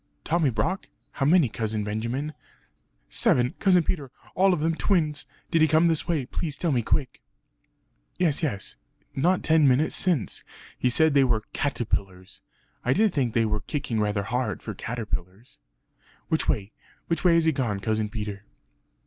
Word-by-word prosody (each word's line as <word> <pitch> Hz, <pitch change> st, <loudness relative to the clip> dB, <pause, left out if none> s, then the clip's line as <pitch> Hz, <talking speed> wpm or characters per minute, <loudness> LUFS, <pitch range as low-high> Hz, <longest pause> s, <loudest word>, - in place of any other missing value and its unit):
"Tommy 165 Hz, -3 st, +2 dB
Brock? 125 Hz, -, -2 dB, 0.2 s
how 135 Hz, -, -1 dB
many, 165 Hz, -3 st, +5 dB
Cousin 110 Hz, -1 st, -2 dB
Benjamin?" 115 Hz, +8 st, -3 dB, 0.7 s
"Seven, 125 Hz, +3 st, +2 dB
Cousin 180 Hz, -4 st, +4 dB
Peter, 150 Hz, -3 st, -2 dB
and 130 Hz, -, -23 dB
all 190 Hz, +1 st, +4 dB
of 180 Hz, -, +1 dB
them 165 Hz, +2 st, +1 dB
twins! 155 Hz, -5 st, 0 dB, 0.2 s
Did 165 Hz, -2 st, +3 dB
he 155 Hz, -, +6 dB
come 160 Hz, +3 st, +4 dB
this 160 Hz, 0 st, 0 dB
way? 160 Hz, -7 st, 0 dB
Please 145 Hz, +2 st, -4 dB
tell 170 Hz, 0 st, 0 dB
me 125 Hz, -3 st, +2 dB
quick!" 130 Hz, +4 st, -2 dB, 1.0 s
"Yes, 165 Hz, -6 st, +1 dB
yes; 110 Hz, -, -3 dB, 0.4 s
not 175 Hz, +7 st, +2 dB
ten 160 Hz, -2 st, +4 dB
minutes 135 Hz, +4 st, +2 dB
since... 175 Hz, -, 0 dB, 0.3 s
he 125 Hz, -, +1 dB
said 160 Hz, +4 st, +3 dB
they 140 Hz, -1 st, +5 dB
were 115 Hz, -4 st, +1 dB
caterpillars; 95 Hz, -9 st, -3 dB, 0.4 s
I 125 Hz, -, +2 dB
did 215 Hz, +2 st, +2 dB
think 125 Hz, -6 st, 0 dB
they 115 Hz, -1 st, +3 dB
were 105 Hz, -1 st, -1 dB
kicking 120 Hz, +1 st, -3 dB
rather 105 Hz, -1 st, 0 dB
hard, 110 Hz, 0 st, -2 dB
for 105 Hz, -, -5 dB
caterpillars." 105 Hz, -2 st, -6 dB, 0.7 s
"Which -, -, 0 dB
way? 100 Hz, +1 st, 0 dB, 0.3 s
which 165 Hz, -, -2 dB
way 175 Hz, -2 st, +5 dB
has 165 Hz, -1 st, +3 dB
he 160 Hz, -, +4 dB
gone, 120 Hz, -8 st, -1 dB
Cousin 110 Hz, 0 st, -1 dB
Peter?" 105 Hz, -2 st, -5 dB
130 Hz, 165 wpm, -26 LUFS, 110-160 Hz, 1.0 s, he